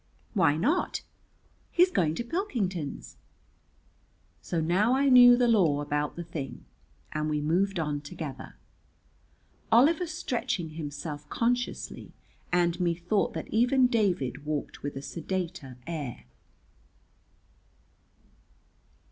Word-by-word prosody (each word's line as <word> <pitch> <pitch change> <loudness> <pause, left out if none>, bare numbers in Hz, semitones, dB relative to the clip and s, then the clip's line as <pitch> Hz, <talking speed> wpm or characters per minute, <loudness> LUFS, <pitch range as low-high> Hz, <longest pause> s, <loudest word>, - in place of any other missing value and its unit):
"Why 165 -8 +3
not?" 300 - 0 0.7
"He's 360 +1 +4
going 160 - +1
to 235 - -3
Pilkington's." 225 - -3 1.2
So 170 - -2
now 185 +10 +2
I 275 +1 +3
knew 245 -1 +9
the 245 -1 +3
law 180 -11 +3
about 145 0 -2
the 175 - -5
thing, 150 -6 -7 0.5
and 155 0 -2
we 150 -1 0
moved 180 +6 +1
on 150 -2 -2
together, 145 -2 -7 1.2
Oliver 310 +9 +5
stretching 235 - -2
himself 145 -1 -6
consciously, 245 +1 -2 0.4
and 175 0 +2
methought 175 +3 0
that - - -4
even 245 +3 +4
David 185 - 0
walked 150 -1 -4
with 145 -1 -5
a 135 - -6
sedater 170 -7 -4
air. 145 - -5
175 Hz, 105 wpm, -28 LUFS, 150-235 Hz, 1.2 s, knew